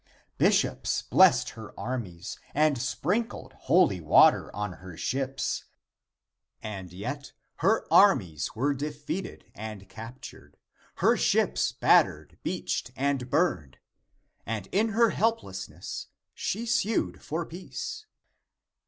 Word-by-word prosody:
Bishops - - +2
blessed - - +5
her - - -11
armies 100 -8 -5 0.2
and 150 0 +4
sprinkled 185 - -2
holy 105 - +3
water 80 - +5
on 105 -2 -3
her 90 -1 -11
ships, 135 +7 -2 0.9
and 95 -5 -7
yet 130 +10 -6 0.2
her 195 +8 +2
armies 90 - +4
were 140 +5 +1
defeated 150 +6 -5
and 105 -2 -8
captured, 115 +6 -11 0.5
lier - - +5
ships - - +2
battered, - - +2
beached - - -2
and 135 -2 -1
burned, 140 - 0 0.7
and 110 -3 -4
in 215 +4 +2
her 225 +1 +3
helplessness 150 - -3 0.3
she 225 +4 -3
sued 225 -2 0
for 165 +2 -3
peace. 430 - -7
135 Hz, 105 wpm, -28 LUFS, -, 0.9 s, blessed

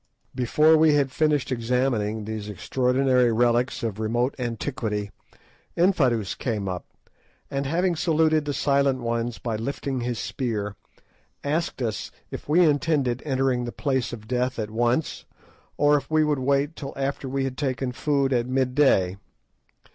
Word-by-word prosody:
Before 150 +6 +4
we 155 -1 +5
had 140 -2 +2
finished 150 -2 +1
examining 115 -3 0
these 110 -1 -5
extraordinary 125 +4 +2
relics 120 +2 +1
of 110 -2 -3
remote 120 +4 0
antiquity, 115 -4 -3 0.7
Infadoos 130 - +2
came 105 -6 -3
up, 90 -1 -4 0.6
and 140 0 -2
having 175 +4 +1
saluted 155 -1 +2
the 145 - -1
"Silent 140 -2 +2
Ones" 115 0 -2
by 115 -2 -3
lifting 130 +3 -3
his 120 -1 -2
spear, 105 -5 -3 0.7
asked 150 -2 -1
us 110 -3 -3 0.2
if - - -8
we 170 +3 +5
intended 145 -5 +1
entering 130 -2 +1
the 120 - -4
"Place 130 -3 -1
of 110 -3 -9
Death" 125 +1 -1
at 110 -2 -3
once, 120 +6 0 0.5
or 145 0 +4
if 140 - -6
we 155 0 +3
would 150 -2 +1
wait 140 +4 +1
till 135 -2 -7
after 135 0 -3
we 135 +1 -1
had 135 -1 -3
taken 130 -2 -2
food 140 +1 0
at 120 -1 +1
mid 130 0 0
day. 95 -10 +3
130 Hz, 150 wpm, -25 LUFS, 115-145 Hz, 0.7 s, we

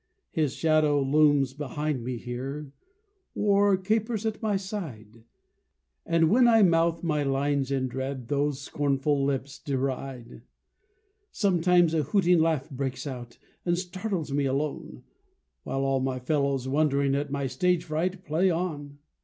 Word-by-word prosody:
His 150 -4 0
shadow 155 -2 +3
looms 140 -1 +3
behind 145 -1 -3
me 125 0 -3
here, 135 +5 -6 0.6
Or 200 -1 +3
capers 220 +3 -1
at 220 -1 -2
my 210 -3 +1
side; 125 - -7 0.8
And 165 -1 +3
when 245 +2 +5
I 225 -2 +6
mouth 165 -1 +2
my 155 -3 0
lines 140 0 0
in 135 -1 0
dread, 130 -1 -5
Those 145 0 0
scornful 140 0 0
lips 135 -1 -2
deride. 130 -3 -4 0.9
Sometimes 180 -4 +3
a 160 - +2
hooting 175 +3 +3
laugh 160 -4 +1
breaks 135 0 -4
out, 120 -4 -7 0.3
And 175 -1 +1
startles 185 -3 -4
me 140 0 +1
alone; 140 +2 -3 0.6
While 135 - -2
all 135 0 +1
my 130 0 -1
fellows, 135 0 0
wondering 140 -1 +2
At 145 +1 -1
my 140 0 -2
stage 180 +5 +1
fright, 175 +4 -2
play 165 +5 +2
on. 155 -5 -3
145 Hz, 135 wpm, -27 LUFS, 135-175 Hz, 0.9 s, I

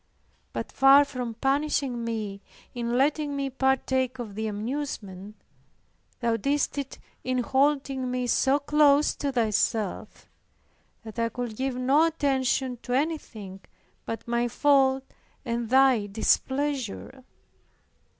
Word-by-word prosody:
But - - -5
far 275 +1 +6
from 250 -4 -5
punishing 270 -1 0
me 215 -4 -4 0.3
in 240 0 -2
letting 290 +1 +1
me 275 -1 -2
partake 260 -1 0
of 230 -5 -6
the 220 +2 -3
amusement, 210 -3 -5 0.9
Thou 230 -1 +1
didst 285 +5 0
it 275 -1 -6 0.3
in 255 -1 0
holding 270 -1 +1
me 250 0 -1
so 265 +3 +3
close 295 0 +3
to 280 - -2
Thyself, 220 -3 -1 0.8
that 220 +1 -8
I 230 0 +1
could 240 -1 -5
give 265 +2 -2
no 270 +6 +3
attention 265 -4 0
to 245 - -5
anything 250 - -3 0.5
but 225 0 -5
my 235 0 +1
fault 270 +1 +3 0.4
and 235 -1 -2
Thy 260 -5 +4
displeasure. 265 +3 -1
255 Hz, 120 wpm, -26 LUFS, 230-275 Hz, 0.9 s, far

